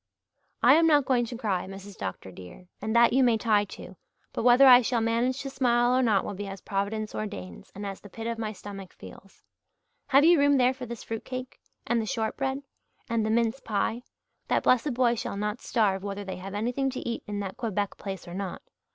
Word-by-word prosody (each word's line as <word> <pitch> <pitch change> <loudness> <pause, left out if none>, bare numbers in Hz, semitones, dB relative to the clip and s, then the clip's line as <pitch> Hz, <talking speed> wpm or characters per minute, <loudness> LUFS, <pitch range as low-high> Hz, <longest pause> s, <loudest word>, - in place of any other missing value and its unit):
"I - - +8
am 330 0 +4
not 295 -4 +4
going 250 -2 +2
to 235 0 -7
cry, 195 -6 -1
Mrs. 195 +1 -10
Dr. 95 0 -6
dear, 90 - -12 0.2
and 220 +1 -2
that 235 0 +6
you 265 +1 +4
may 235 -3 +4
tie 210 -2 +2
to, - - -11 0.4
but - - -2
whether 245 +3 +6
I 250 -1 +9
shall 240 0 0
manage 235 +4 0
to 275 - -4
smile 245 -2 +2
or 260 - +3
not 215 -6 +2
will - - -4
be 200 +1 -6
as 195 0 -7
Providence 210 +2 -3
ordains 205 -3 -7
and 205 +1 -6
as 195 -1 -5
the 205 - -12
pit 225 +3 -8
of 230 0 -3
my 215 -1 -2
stomach 195 -2 -9
feels. 195 0 -14 0.6
Have 280 +2 +5
you 340 -1 +6
room 285 0 +4
there 255 0 +4
for 255 -1 -8
this 235 -1 -7
fruit 225 -1 -5
cake? 255 0 -7 0.3
And 235 -1 +1
the 220 - -4
shortbread? 265 +3 -2 0.5
And 230 -1 +1
the 215 - -1
mince 230 +3 +1
pie? 220 +1 -1 0.5
That - - +1
blessed 255 +1 +2
boy 245 -1 +3
shall 220 -3 -4
not 210 +3 -3
starve, 200 -5 +1
whether 200 0 -4
they 190 - -5
have 195 +2 -7
anything 245 +6 -1
to 260 - -5
eat 235 - -3
in 205 -1 -3
that 195 -1 -6
Quebec 205 -3 -2
place 195 -3 -7
or 175 - -8
not. 190 -1 -5
225 Hz, 220 wpm, -27 LUFS, 200-250 Hz, 0.6 s, I